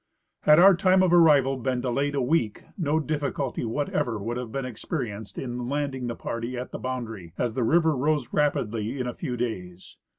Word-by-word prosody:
Had 150 0 +7
our 190 +2 +8
time 185 0 +4
of 180 -2 +3
arrival 145 -6 +5
been 130 0 -1
delayed 140 +3 -1
a 135 - +1
week 125 -5 0
no 160 -3 +1
difficulty 145 -4 -2
whatever 120 -1 -1
would 115 +4 -4
have 125 -2 -5
been 135 +1 -3
experienced 110 - -5
in 125 -1 -4
landing 140 -3 -2
the 120 - -3
party 115 +2 -4
at 125 - -5
the - - -6
boundary, 115 -9 -5
as 120 -2 -1
the 125 - -2
river 160 +4 +3
rose 145 -1 0
rapidly 115 -4 0
in 125 - -1
a 125 - -3
few 125 +1 -4
days. 95 -7 -5
130 Hz, 190 wpm, -26 LUFS, 115-145 Hz, -, our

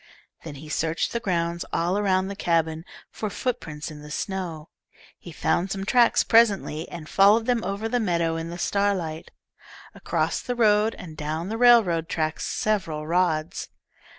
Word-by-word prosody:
Then 155 -3 -8
he 150 +3 -10
searched 160 +1 -1
the 235 - 0
ground, 170 -5 -1
all 175 +3 0
around 190 -2 +1
the 200 - -5
cabin, 165 -3 0 0.3
for 215 - -4
footprints 160 -10 -4
in 150 -1 -10
the 150 - -11
snow. 165 -2 -4 0.5
He 175 - -11
found 175 +3 0
some 195 0 -4
tracks 240 +2 +4
presently, 205 -8 +2
and 165 -3 -8
followed 205 +5 +4
them 245 -2 +1
over 200 +4 -3
the 245 +2 0
meadow 170 -6 0
in 165 0 -4
the 170 - -6
starlight, 185 -5 -1 0.6
across - - -1
the 245 - -3
road, 215 -1 +3
and 160 -3 -10
down 155 +4 -4
the 220 - -3
railroad 215 -10 +5
track 155 0 -1
several 185 -8 -2
rods. 165 -1 0
175 Hz, 160 wpm, -25 LUFS, 160-210 Hz, 0.6 s, railroad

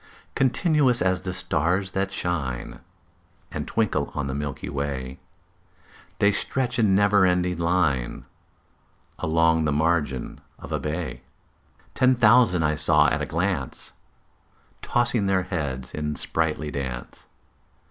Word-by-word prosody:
Continuous 135 -1 +2
as 95 0 +1
the 90 0 -4
stars 90 +2 -1
that 95 +1 -2
shine 75 -11 -3 0.7
And - - -5
twinkle 100 -10 -1
on 75 - -2
the 65 - -3
milky 75 0 -5
way, 70 -2 -4 1.0
The 100 - +4
stretched 125 +4 -1
in 105 -4 +3
never 100 0 +4
ending 90 -1 +1
line 85 -8 0 0.9
Along 80 0 +2
the 75 - +1
margin 75 -4 -1 0.2
of - - -11
a - - -1
bay: 80 +2 -4 0.7
Ten 130 0 +3
thousand 95 - +4
saw 75 -1 +6
I - - -7
at - - -1
a - - -3
glance, 85 -5 -3 0.9
Tossing 120 -4 +1
their 95 -1 +2
heads 70 -8 -4
in 75 0 -3
sprightly 80 -2 -2
dance. 65 -4 -6
85 Hz, 125 wpm, -24 LUFS, 75-100 Hz, 1.0 s, saw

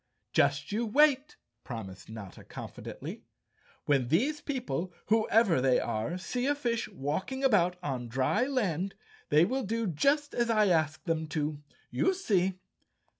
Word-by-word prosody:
"Just 145 0 +2
you 220 +3 0
wait," 290 +3 +3 0.3
promised 95 -5 -8
Notta 110 -4 -9
confidently. - - -8 0.6
"When 135 -4 +2
these 270 - +1
people, 250 - -3 0.2
whoever 215 - +4
they 130 -1 +4
are, 115 +9 -2
see 245 +7 -2
a 290 - +2
fish 240 -5 -1
walking 190 - -3
about 185 -9 +4
on 130 -5 -3
dry 130 - +1
land, 195 - -1 0.3
they 155 +3 +5
will 260 +7 -1
do 230 +1 -1
just 280 - +1
as 235 -1 0
I 215 -3 +4
ask 155 -3 +1
them 160 -2 -1
to. 150 -1 -2 0.3
You 375 - +2
see!" 190 - +1
185 Hz, 140 wpm, -30 LUFS, -, 0.6 s, they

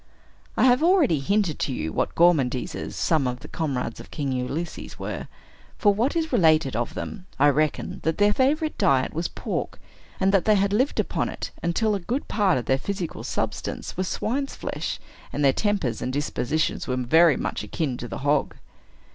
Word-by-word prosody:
I - - +3
have 250 +1 +5
already 325 - +4
hinted 190 +2 0
to - - -1
you 80 -10 -3
what - - -1
gormandizers 155 -3 +2
some 155 -6 +1
of 125 0 -4
the - - -9
comrades 135 -7 -3
of - - -11
King 140 -3 -3
Ulysses 135 +6 -4
were. - - -5 0.5
From 205 -3 +4
what 240 +9 +1
is 320 -3 -1
related 160 - +4
of 120 +1 -2
them, 190 -4 -6
I 145 +2 +5
reckon 150 +1 0
that 160 0 0
their 205 0 +4
favorite 305 +6 +1
diet 130 -2 +3
was 165 +2 -1
pork, - - -4 0.4
and 190 0 +3
that 195 -3 +3
they 215 - +5
had 200 0 +2
lived 255 +7 +1
upon - - 0
it - - -6
until 210 +6 +1
a 200 - 0
good 245 +10 -3
part 200 -7 +2
of 125 - -3
their 130 0 +2
physical 190 0 -4
substance - - -3
was 185 +1 -1
swine's 270 +10 -2
flesh, - - -4 0.3
and 145 - 0
their 135 - +5
tempers 195 - 0
and 130 - -2
dispositions 145 +1 -1
were 125 - -1
very 155 +4 +5
much - - -3
akin 150 -7 -2
to 120 - -6
the - - -5
hog. 145 0 +2
165 Hz, 190 wpm, -25 LUFS, 135-205 Hz, 0.5 s, have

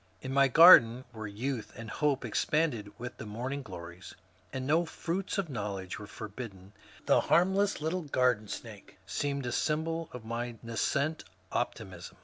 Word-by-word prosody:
Li 130 - -4
my 140 0 +5
garden, 130 -5 +8
where 110 -2 -6
youth 115 +4 -4
and 115 0 -8
hope 145 -3 0
expanded 145 -10 0
with 120 +1 -6
the - - -7
morning 125 +7 -4
glories, 90 -5 -10 0.4
and 130 -1 -4
no 160 +5 +3
fruits 175 +4 -3
of 195 -3 0
knowledge 100 - -4
were 105 - -8
forbidden, 100 -3 -8 0.3
the - - +5
harmless 190 +2 +2
little 165 +4 -1
garden 125 -7 +1
snake 105 -1 -9
seemed 140 +7 -2
a 120 - -2
symbol 160 +4 -1
of 125 -3 -9
my 120 +1 -3
nas 115 -1 -3
cent 155 +2 0 0.3
optimism. 95 -7 -4
125 Hz, 155 wpm, -30 LUFS, 110-150 Hz, 0.4 s, garden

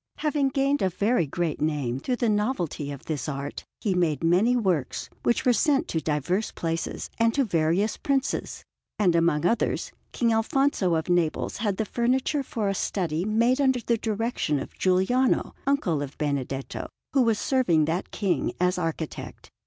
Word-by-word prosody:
Having 295 -2 +1
gained 275 +1 +1
a 190 - +2
very 205 0 +1
great 165 +1 -2
name 145 -5 -1
through 250 - -1
the 240 -1 0
novelty 210 - -1
of 140 - -9
this 150 -2 -3
art, 140 0 -5 0.2
he 200 - +1
made 165 -5 +1
many 185 +9 +4
works, 185 - -1
which 235 - +1
were 250 - +5
sent 280 +3 +2
to 165 - 0
diverse 160 +8 -1
places 165 0 -3
and 230 0 +3
to 280 - +3
various 175 +3 +1
Princes; 275 -1 -1 0.3
and 185 -5 +3
among 165 -2 +2
others 230 +4 0 0.2
King 235 -2 +1
Alfonso 225 -5 +2
of 160 0 -1
Naples 175 -3 0
had 205 -2 -1
the 220 - 0
furniture 255 +6 0
for 225 -5 -3
a 195 - +1
study, 175 -3 -1
made 235 +5 +2
under 260 -2 +3
the 235 0 +1
direction 225 - -1
of - - -6
Giuliano, 190 +8 +2
uncle 195 - +1
of 140 -1 -6
Benedetto, 140 -2 -3 0.3
who 275 - +4
was 230 -3 +3
serving 190 - +2
that 165 +4 -2
King 200 -4 -1
as 180 +1 +2
architect. 165 -2 -5
190 Hz, 170 wpm, -26 LUFS, 160-240 Hz, 0.3 s, were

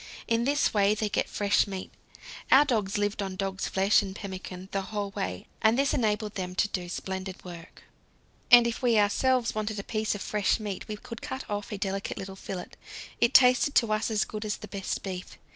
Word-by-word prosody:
In 230 +1 +1
this 290 +2 +2
way 205 0 +3
they 215 0 -1
get - - 0
fresh 205 0 +2
meat. 190 -2 -6 0.6
Our 280 +3 +8
dogs 215 -8 0
lived 205 0 -1
on 190 -1 -4
dog's 190 0 -2
flesh 195 +2 +3
and 190 -1 -6
pemmican 190 -2 -7
the 195 - -1
whole 205 0 -4
way, 90 - -4 0.2
and 220 +2 +4
this 275 0 +2
enabled 215 -2 0
them 180 -2 -4
to 205 - +2
do 180 -3 -4
splendid 190 +1 -5
work. 170 -1 -11 0.7
And 240 -1 +9
if 235 +2 -2
we 240 -3 +3
ourselves 235 +4 +2
wanted 215 0 -2
a 200 - -4
piece 215 -1 -1
of 205 - -6
fresh 210 +1 +1
meat 205 -3 -5
we 210 - -5
could 230 +2 -9
cut 265 0 -5
off 205 +2 -4
a 210 - -3
delicate 195 0 -3
little 195 0 -6
fillet; 190 -2 -6 0.5
it 235 - +2
tasted 250 +2 +6
to 220 -2 +4
us 215 +1 0
as 215 -1 +1
good 215 0 -6
as 215 -1 -2
the 210 - -9
best 195 -1 -4
beef. 185 -2 -6
205 Hz, 210 wpm, -28 LUFS, 190-220 Hz, 0.7 s, And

